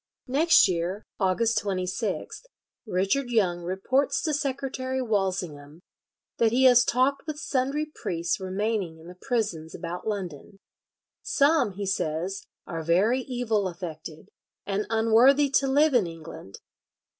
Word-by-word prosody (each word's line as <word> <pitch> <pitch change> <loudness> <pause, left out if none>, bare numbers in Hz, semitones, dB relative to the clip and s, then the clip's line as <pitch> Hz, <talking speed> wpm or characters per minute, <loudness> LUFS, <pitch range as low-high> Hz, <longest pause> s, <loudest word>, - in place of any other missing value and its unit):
Next 305 +4 +5
year, 180 +3 -2 0.2
August 220 +4 +2
26th, 185 - -3 0.4
Richard 195 +8 0
Young 185 -7 +1
reports 195 +11 0
to 310 - 0
Secretary 265 -2 -2
Walsyngham 180 - -2 0.6
that 225 -1 +4
he 255 +3 +2
has 245 -2 +7
talked 265 +6 +1
with 305 -1 -4
sundry 280 +1 -1
priests 170 +2 -2
remaining 190 -2 -2
in 160 - -15
the 175 - -10
prisons 185 -7 -3
about 175 +5 -6
London. 195 -3 -5 0.6
"Some," 280 -7 +2
he 200 +2 -5
says, 185 +1 -2 0.2
"are 165 -1 -5
very 190 +10 +2
evil 240 -6 -1
affected, 165 -3 -8 0.4
and 200 +1 -2
unworthy 235 +6 +4
to 275 0 +3
live 290 +3 +3
in 225 -8 +3
England. 165 -12 -10
210 Hz, 125 wpm, -26 LUFS, 180-260 Hz, 0.6 s, has